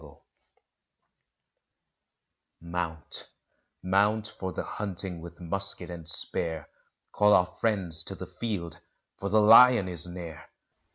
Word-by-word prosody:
_ 75 Hz, -2 st, -15 dB, 2.4 s
Mount 85 Hz, -2 st, -4 dB, 0.5 s
mount 105 Hz, +4 st, +2 dB
for 95 Hz, -1 st, -3 dB
the -, -, -4 dB
hunting 95 Hz, -4 st, -5 dB
with 85 Hz, 0 st, -11 dB
musket 95 Hz, 0 st, -5 dB
and 85 Hz, -2 st, -5 dB
spear! 80 Hz, -2 st, -1 dB, 0.4 s
Call 105 Hz, 0 st, +4 dB
our 90 Hz, -, +5 dB
friends 90 Hz, -5 st, 0 dB
to 95 Hz, -, -4 dB
the 95 Hz, -, -7 dB
field 90 Hz, -3 st, -5 dB, 0.4 s
for 100 Hz, -, -3 dB
the 110 Hz, +2 st, +4 dB
lion 115 Hz, -1 st, +7 dB
is 90 Hz, -1 st, -1 dB
near! 85 Hz, -4 st, -9 dB
90 Hz, 115 wpm, -28 LUFS, 85-100 Hz, 2.4 s, lion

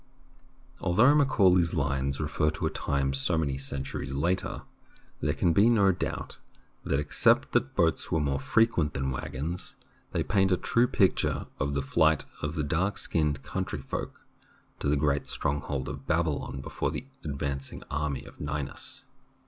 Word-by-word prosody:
Although 110 Hz, +10 st, +5 dB
Macaulay's 95 Hz, -, +4 dB
lines 70 Hz, -2 st, 0 dB
refer 75 Hz, 0 st, +1 dB
to 75 Hz, -, -3 dB
a -, -, 0 dB
time 70 Hz, -1 st, -1 dB
so 70 Hz, +5 st, +2 dB
many 70 Hz, -4 st, 0 dB
centuries 70 Hz, 0 st, -4 dB
later, 85 Hz, +7 st, -1 dB, 0.6 s
there 75 Hz, +2 st, 0 dB
can 85 Hz, -3 st, +2 dB
be 105 Hz, +7 st, +5 dB
no 100 Hz, -5 st, +5 dB
doubt 90 Hz, -, -4 dB, 0.4 s
that, 70 Hz, -, 0 dB
except 75 Hz, -, +3 dB
that 70 Hz, -, +1 dB
boats 80 Hz, -1 st, +1 dB
were 80 Hz, -, +2 dB
more 70 Hz, -2 st, 0 dB
frequent 85 Hz, -, +2 dB
than 65 Hz, -1 st, -1 dB
wag 60 Hz, -, -5 dB
gons, 80 Hz, +7 st, -4 dB, 0.4 s
they -, -, 0 dB
paint 95 Hz, -2 st, +2 dB
a 90 Hz, -, +4 dB
true 120 Hz, +6 st, +2 dB
picture 100 Hz, -7 st, +2 dB
of 70 Hz, +1 st, -1 dB
the 70 Hz, -, 0 dB
flight 80 Hz, +2 st, +3 dB, 0.2 s
of 75 Hz, +3 st, -3 dB
the 75 Hz, -, 0 dB
dark 90 Hz, +7 st, 0 dB
skinned 75 Hz, -4 st, 0 dB
country 95 Hz, +1 st, -3 dB
folk 65 Hz, -, -5 dB, 0.5 s
to 70 Hz, -, 0 dB
the 75 Hz, -, +3 dB
great 70 Hz, 0 st, +1 dB
strong 70 Hz, +1 st, -1 dB
hold 70 Hz, -2 st, -3 dB
of 70 Hz, 0 st, -7 dB
Babylon 80 Hz, -6 st, 0 dB
before -, -, -2 dB
the -, -, -5 dB, 0.2 s
advancing 70 Hz, -2 st, -4 dB
army 75 Hz, -1 st, -2 dB
of -, -, -14 dB
Ninus. 75 Hz, -1 st, -4 dB
75 Hz, 165 wpm, -28 LUFS, 70-90 Hz, 0.6 s, Although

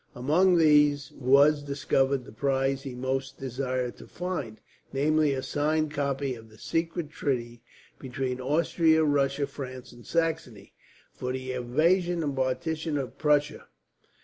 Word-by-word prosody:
Among 170 Hz, +9 st, +3 dB
these 150 Hz, -3 st, +4 dB
was 140 Hz, +3 st, +4 dB
discovered 140 Hz, -2 st, 0 dB
the -, -, -11 dB
prize 135 Hz, +3 st, 0 dB
he 135 Hz, -3 st, -7 dB
most 135 Hz, +2 st, -3 dB
desired 130 Hz, -1 st, -3 dB
to -, -, -12 dB
find; 175 Hz, -12 st, -5 dB, 0.3 s
namely 150 Hz, +1 st, +2 dB
a 130 Hz, -1 st, -3 dB
signed 155 Hz, +1 st, 0 dB
copy 140 Hz, -2 st, -1 dB
of 115 Hz, -2 st, -12 dB
the 110 Hz, -, -18 dB
secret 165 Hz, +1 st, -2 dB
treaty, 120 Hz, -6 st, -3 dB, 0.4 s
between 130 Hz, -1 st, -4 dB
Austria, 160 Hz, +3 st, +2 dB
Russia, 140 Hz, -1 st, +1 dB
France, 130 Hz, -2 st, -8 dB
and 120 Hz, -1 st, -14 dB
Saxony, 160 Hz, -10 st, -2 dB, 0.4 s
for 125 Hz, -, -4 dB
the 130 Hz, 0 st, -4 dB
invasion 165 Hz, +8 st, +1 dB
and 145 Hz, -2 st, -2 dB
partition 155 Hz, +4 st, -1 dB
of 135 Hz, -3 st, -5 dB
Prussia. 150 Hz, -1 st, +1 dB
140 Hz, 135 wpm, -27 LUFS, 130-155 Hz, 0.4 s, these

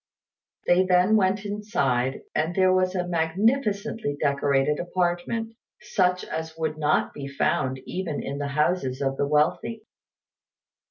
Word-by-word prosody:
They 180 Hz, +1 st, +4 dB
then 185 Hz, +3 st, +4 dB
went 195 Hz, 0 st, +2 dB
inside, 135 Hz, -, -1 dB
and 165 Hz, +3 st, -1 dB
there 185 Hz, -1 st, +4 dB
was 185 Hz, 0 st, +1 dB
a 180 Hz, -1 st, -1 dB
magnificently 200 Hz, -, 0 dB
decorated 140 Hz, +1 st, +1 dB
apartment, 180 Hz, +6 st, -1 dB, 0.3 s
such 180 Hz, -4 st, +1 dB
as 160 Hz, 0 st, -5 dB
would 155 Hz, -1 st, -2 dB
not 150 Hz, -1 st, +1 dB
be 140 Hz, -1 st, -6 dB
found 130 Hz, -1 st, 0 dB
even 180 Hz, -6 st, -4 dB
in 140 Hz, +1 st, -4 dB
the 145 Hz, -, -2 dB
houses 140 Hz, -2 st, 0 dB
of 135 Hz, 0 st, 0 dB
the 140 Hz, -, 0 dB
wealthy. 150 Hz, +9 st, 0 dB
175 Hz, 130 wpm, -25 LUFS, 145-190 Hz, 0.3 s, They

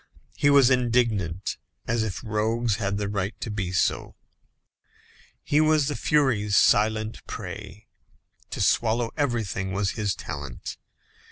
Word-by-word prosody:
He 145 Hz, -, +3 dB
was 140 Hz, -2 st, +6 dB
indignant, 115 Hz, -8 st, +1 dB, 0.3 s
as 115 Hz, 0 st, 0 dB
if 110 Hz, -2 st, -3 dB
rogues 110 Hz, 0 st, 0 dB
had 100 Hz, -1 st, -1 dB
the 100 Hz, -1 st, -2 dB
right 100 Hz, 0 st, -3 dB
to 110 Hz, -, -4 dB
be 95 Hz, -4 st, -3 dB
so. 90 Hz, -, 0 dB, 1.3 s
He 150 Hz, +1 st, +2 dB
was 155 Hz, -2 st, +3 dB
the 145 Hz, -, -2 dB
furies' 115 Hz, -9 st, +2 dB
silent 110 Hz, +1 st, +2 dB
prey. 100 Hz, +1 st, -8 dB, 0.6 s
To -, -, -4 dB
swallow 115 Hz, 0 st, +2 dB
everything 115 Hz, -, -1 dB
was 100 Hz, -1 st, 0 dB
his 105 Hz, -2 st, -1 dB
talent. 70 Hz, -4 st, -7 dB
110 Hz, 125 wpm, -25 LUFS, 100-120 Hz, 1.3 s, was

